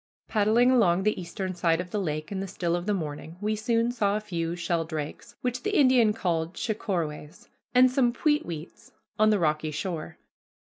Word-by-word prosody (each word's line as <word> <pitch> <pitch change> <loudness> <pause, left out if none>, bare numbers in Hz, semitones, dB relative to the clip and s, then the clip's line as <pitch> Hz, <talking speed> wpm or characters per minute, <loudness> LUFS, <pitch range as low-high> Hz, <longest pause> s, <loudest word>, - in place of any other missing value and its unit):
Paddling 225 +4 +3
along 190 -7 +4
the 210 -2 0
eastern 185 +2 -4
side 170 -2 +1
of 180 0 -5
the 210 - -1
lake 155 -2 -3
in 195 - -2
the 195 - -3
still 175 -2 -1
of 175 +2 -4
the 210 - +2
morning, 160 0 -6
we 210 +1 0
soon 230 +2 +1
saw 210 -4 +1
a - - -1
few 170 -5 -3
sheldrakes, 165 -3 -3
which 250 0 -2
the 415 0 0
Indian 255 -5 +5
called 175 -5 -2
Shecorways, 180 -3 -3 0.3
and 255 0 +7
some 255 -2 +3
peetweets 235 - -2 0.3
on 215 0 +5
the 210 - +4
rocky 155 -3 0
shore. 155 +1 -4
190 Hz, 180 wpm, -27 LUFS, 165-225 Hz, 0.3 s, and